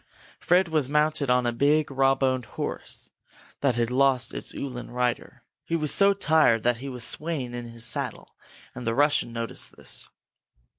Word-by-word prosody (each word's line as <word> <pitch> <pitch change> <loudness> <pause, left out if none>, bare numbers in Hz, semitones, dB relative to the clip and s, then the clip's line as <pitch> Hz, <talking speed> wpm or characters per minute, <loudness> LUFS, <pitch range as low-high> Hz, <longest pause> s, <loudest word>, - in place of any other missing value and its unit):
Fred 180 +1 +3
was 155 -5 0
mounted 150 -1 +1
now 125 0 +4
on 125 - -1
a 120 - +1
big, 145 +4 +2
rawboned 135 -2 +2
horse - - -5 0.5
that 140 -4 +1
had 120 0 0
lost 130 -1 +2
its - - -6
Uhlan 125 -3 -6
rider. 125 0 -2 0.2
He 165 - -2
was 150 -3 0
so 200 0 +4
tired 155 - +3
that 120 -1 +2
he 135 +3 -7
was 125 -3 -5
swaying 150 -4 -2
in 120 -1 -6
his 115 0 -5
saddle, - - -2 0.4
and 125 -2 -7
the 115 - 0
Russian 145 -4 +2
noticed 115 0 -3
this. - - -2
130 Hz, 170 wpm, -26 LUFS, 120-150 Hz, 0.5 s, now